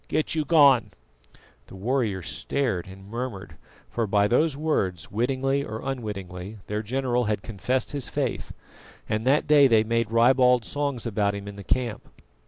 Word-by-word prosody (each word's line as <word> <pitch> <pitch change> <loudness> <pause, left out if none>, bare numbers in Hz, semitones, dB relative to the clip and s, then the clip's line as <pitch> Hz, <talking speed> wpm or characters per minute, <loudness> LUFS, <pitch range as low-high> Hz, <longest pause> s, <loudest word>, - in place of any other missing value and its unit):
Get 155 - 0
you 155 -2 0
gone!" 140 -7 +5 0.8
The - - -12
warriors 105 -4 -1
stared 115 -10 -2
and 95 +1 -12
murmured, 115 -3 -6 0.4
for 115 -2 -1
by 100 0 +3
those 140 +5 +2
words, 100 - -1
wittingly 135 +5 0
or 110 -4 -6
unwittingly, 105 -6 -5
their 105 +1 -3
general 125 +2 -1
had 105 -2 -1
confessed 120 +4 -2
his 140 -4 -3
faith, - - -3 0.6
and 110 +3 -2
that 140 +3 +3
day 145 -2 +6
they 110 -3 +4
made 115 0 0
ribald 125 +1 +4
songs 140 -4 -2
about 100 -2 0
him 100 0 -7
in 100 - -7
the 100 - -9
camp. 120 0 -2
115 Hz, 160 wpm, -25 LUFS, 105-135 Hz, 0.8 s, day